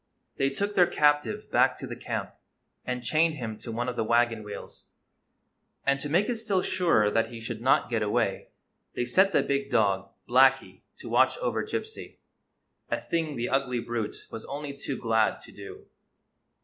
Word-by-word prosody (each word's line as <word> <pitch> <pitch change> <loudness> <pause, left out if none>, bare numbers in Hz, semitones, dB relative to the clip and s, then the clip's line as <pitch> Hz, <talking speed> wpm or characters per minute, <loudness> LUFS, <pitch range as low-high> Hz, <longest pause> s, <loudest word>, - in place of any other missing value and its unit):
They 135 - +2
took 200 +9 -2
their 180 -3 +5
captive 150 +8 +1
back - - +3
to - - -7
the - - -6
camp, - - -4 0.5
and 125 -1 -3
chained 155 +5 +2
him 115 -5 -5
to 115 - -7
one 120 +2 -2
of 125 - -3
the 115 - 0
wagon 115 0 +2
wheels; 105 -1 -10 0.9
and, 140 0 +2
to 145 - -5
make 175 +7 +2
it 245 - -1
still 205 -4 0
surer 165 - +2
that 115 +1 +1
he 115 -1 -8
should 115 0 -6
not 130 - +3
get 115 -2 +1
away, 105 -1 0 0.5
they 120 - -1
set 190 +11 +3
the - - +3
big 140 0 -1
dog, 100 -5 +1 0.2
Blacky, 135 +2 +3 0.2
to - - -10
watch - - +3
over - - -1
Gypsy 440 0 -6 0.4
— - - -51 0.3
a - - 0
thing 160 -3 -2
the 120 0 -2
ugly 130 -2 0
brute 115 -2 -4
was 115 - -7
only 145 0 -5
too 140 -1 -5
glad 110 -2 +1
to - - -14
do. - - -11
130 Hz, 185 wpm, -27 LUFS, 115-155 Hz, 0.9 s, their